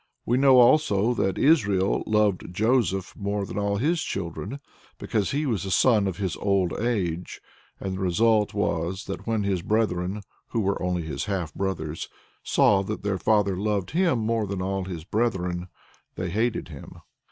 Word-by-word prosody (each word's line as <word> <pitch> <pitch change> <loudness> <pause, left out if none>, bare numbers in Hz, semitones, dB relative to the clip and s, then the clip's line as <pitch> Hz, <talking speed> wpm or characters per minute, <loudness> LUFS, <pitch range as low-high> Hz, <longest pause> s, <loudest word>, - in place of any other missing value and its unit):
" - - -52
We 120 - +2
know 135 -1 +6
also 120 -4 +4
that 95 -5 0
"Israel 105 - +3
loved 105 -5 +1
Joseph 100 -2 +1
more 100 0 -2
than 100 - -5
all 100 0 0
his 160 +8 +1
children," 95 - -4 0.4
because 105 -3 -1
he 145 +2 -1
was 115 - 0
the 95 - -4
son 105 +2 +3
"of 95 -2 -3
his 95 -5 -2
old 95 -3 +1
age," 90 -8 -2 0.4
and 95 - -4
the 95 - -5
result 105 +3 +2
was 95 -1 -1
that 100 - -6
"when 110 -2 0
his 95 -3 0
brethren 100 -1 -1 0.2
[who 115 - -2
were 100 0 -1
only 90 -1 -1
his 80 - -4
half 95 -6 -3
brothers] 80 -5 -3 0.3
saw 100 -2 +3
that 105 +2 -5
their 100 -2 -1
father 105 -3 +2
loved 100 -1 -1
him 170 -3 +2
more 110 -1 0
than 100 -1 -4
all 95 0 -2
his 85 -4 -6
brethren, 90 -4 -1 0.5
they 90 -1 -3
hated 110 -2 -1
him." 75 -4 -10
100 Hz, 175 wpm, -25 LUFS, 95-110 Hz, 0.5 s, know